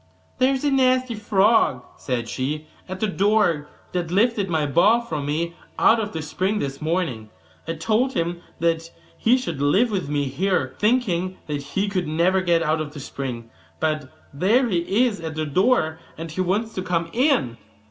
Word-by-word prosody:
'There 260 +1 +4
is 265 - -4
a 290 - +2
nasty 255 -2 +3
frog,' 210 - +2
said 120 -3 -3
she, 150 +6 -3 0.2
'at 185 0 -5
the 215 - +1
door, 200 -6 +1 0.2
that 175 -2 -2
lifted 205 +1 +2
my 160 -3 +1
ball 175 - +4
for 160 -11 -4
me 155 +4 -2 0.2
out 230 - +5
of 215 -1 -3
the 160 -1 -4
spring 190 +7 -1
this 140 -6 -4
morning: 155 -10 -2 0.4
I 165 - -1
told 220 +10 0
him 170 +1 -2 0.2
that 165 0 0 0.3
he 240 +3 +3
should 170 - -4
live 195 +12 +3
with 185 -8 -2
me 145 -1 0
here, 140 -1 0
thinking 190 -6 +1
that 145 -2 -3
he 170 +9 -2
could 185 -4 -1
never 175 +5 +2
get 170 -2 +2
out 155 0 +1
of 150 -1 -6
the 150 - -8
spring; 125 -4 -6 0.3
but 155 -4 -1 0.2
there 215 - +3
he 195 +6 +2
is 220 -5 -2
at 160 -1 -5
the 155 0 -1
door, 160 - +2 0.2
and 165 0 -6
he 185 - -2
wants 205 +5 0
to 185 - -3
come 170 -2 -1
in. 245 - +2
175 Hz, 185 wpm, -23 LUFS, 150-215 Hz, 0.4 s, out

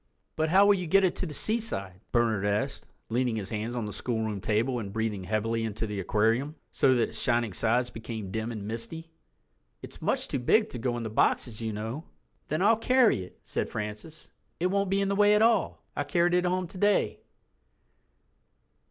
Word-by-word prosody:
"But 160 0 0
how 195 +4 +6
will 205 - +6
you 180 -3 -2
get 195 +4 +4
it 185 - +2
to 185 - -2
the 150 - -7
seaside?" 135 - -1
Bernard 115 -4 +2
asked, 105 +1 -1 0.2
leaning 120 0 0
his 100 -3 -4
hands 110 +2 -3
on 120 -3 -2
the 105 - -5
schoolroom 110 -4 -2
table 115 +5 0
and 100 -3 -6
breathing 110 -3 -2
heavily 110 +3 -1
into 110 0 -3
the 105 -2 -4
aquarium, 115 - +1 0.2
so 130 -1 +3
that 120 - +1
its - - -7
shining 120 -4 +1
sides 120 +5 +1
became 110 -3 -6
dim 110 +3 -3
and 105 -3 -6
misty. 115 +9 -5 0.7
"It's - - -10
much - - 0
too 135 - -2
big 215 - +3
to 125 - -6
go 120 +1 -1
in 120 - -4
the 110 - -4
boxes, 115 -2 +1
you 110 -1 -2
know." 110 +9 -5 0.4
"Then 155 +4 0
I'll 220 +2 +5
carry 250 - +3
it," 90 - -11
said - - -3
Francis, 105 +10 -6 0.3
"it 175 - 0
won't 200 -1 +1
be 195 +1 +2
in 200 - +1
the 200 - 0
way 205 +1 +5
at 210 - +4
all—I 230 0 +1
carried 175 -1 +2
it 180 0 +3
home 180 +1 0
today." 200 +4 +1
120 Hz, 195 wpm, -28 LUFS, 110-180 Hz, 0.7 s, how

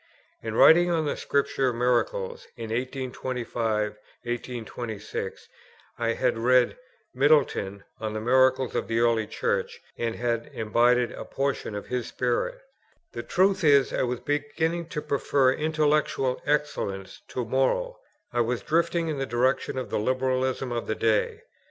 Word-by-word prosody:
In 110 -1 -4
writing 175 +7 +7
on 165 -2 +1
the 145 - -1
Scripture 135 -2 0
Miracles 475 - 0
in 110 - -6
1825 120 -4 -2 1.0
6, 100 -2 -6 0.5
I 115 -1 +1
had 125 -2 0
read 125 +1 +4 0.4
Middleton 130 -8 +2 0.2
on 110 -1 -3
the 110 - -2
Miracles 130 +2 +3
of - - -1
the 115 0 -1
early 115 -2 +2
Church, - - -2 0.2
and 115 -1 -1
had 115 -1 -2
imbibed 120 +2 +2
a - - -7
portion 135 -5 -2
of 105 - -5
his 125 -2 -3
spirit. 125 - -1 0.5
The - - -5
truth 190 +1 +2
is, 140 -3 +5
I - - 0
was 125 -1 -1
beginning 160 +3 -1
to 150 -2 -4
prefer 140 -1 +2
intellectual 150 -3 +1
excellence 145 -10 -2
to 125 - -3
moral; 135 - 0 0.3
I 120 - +2
was 120 +1 -1
drifting 170 +1 +1
in 150 -3 -2
the 135 - -2
direction 130 +2 0
of 130 - -4
the - - 0
Liberalism 130 +2 0
of 120 -1 -3
the 110 - -1
day. 110 -1 +1
130 Hz, 145 wpm, -26 LUFS, 115-145 Hz, 1.0 s, writing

